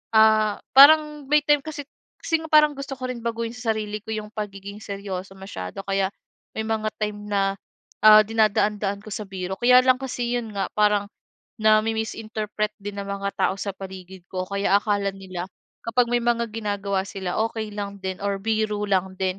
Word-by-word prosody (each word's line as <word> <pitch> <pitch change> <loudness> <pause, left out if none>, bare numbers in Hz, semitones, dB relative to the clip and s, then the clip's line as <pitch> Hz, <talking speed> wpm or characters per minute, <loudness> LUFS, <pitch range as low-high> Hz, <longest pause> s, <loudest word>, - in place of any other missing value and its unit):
ah, 215 -1 +5 0.2
parang 300 0 +7
may 300 - +7
time 295 -1 +4
kasi 300 -3 -6 0.3
kasi 325 - 0
nga, 320 - -8
parang 300 -1 +6
gusto 275 0 -7
ko 255 0 -6
rin 245 -2 -4
baguhin 230 0 -2
sa 240 -2 -1
sarili 210 -1 -4
ko 220 - -7
'yong, 215 -1 -4
pagiging 200 -1 -6
seryoso 195 -2 -6
masyado, 190 - -7
kaya 195 -1 +1 0.5
may 220 - -2
mga 220 -1 0
time 210 -1 -3
na, 195 -1 +1 0.5
ah, 215 0 +10
dinadaan-daan 210 -2 +1
ko - - -15
sa 215 - -4
biro. 190 -1 -4
Kaya 250 +1 +7
lang 255 -1 +6
kasi, 245 -2 -2
'yon 230 -2 -5
nga, 195 - -1
parang, 210 -1 +3 0.5
nami-misinterpret 215 -1 0
din 205 0 -6
ng 200 - -9
mga 200 0 -2
tao - - +2
sa 200 - -2
paligid 190 -1 -10
ko, 185 -1 -3
kaya 200 0 +2
akala 205 -2 0
nila, 185 -2 -6 0.4
kapag 240 +1 +2
may 240 - +3
mga 235 0 +1
ginagawa 200 -3 -1
sila, 190 -3 -4
okey 220 -2 -5
lang 200 -1 -5
din 190 -1 -4
or 200 -1 -1
biro 215 -1 0
lang 190 -1 0
din. 190 0 -1
210 Hz, 180 wpm, -24 LUFS, 195-225 Hz, 0.5 s, ah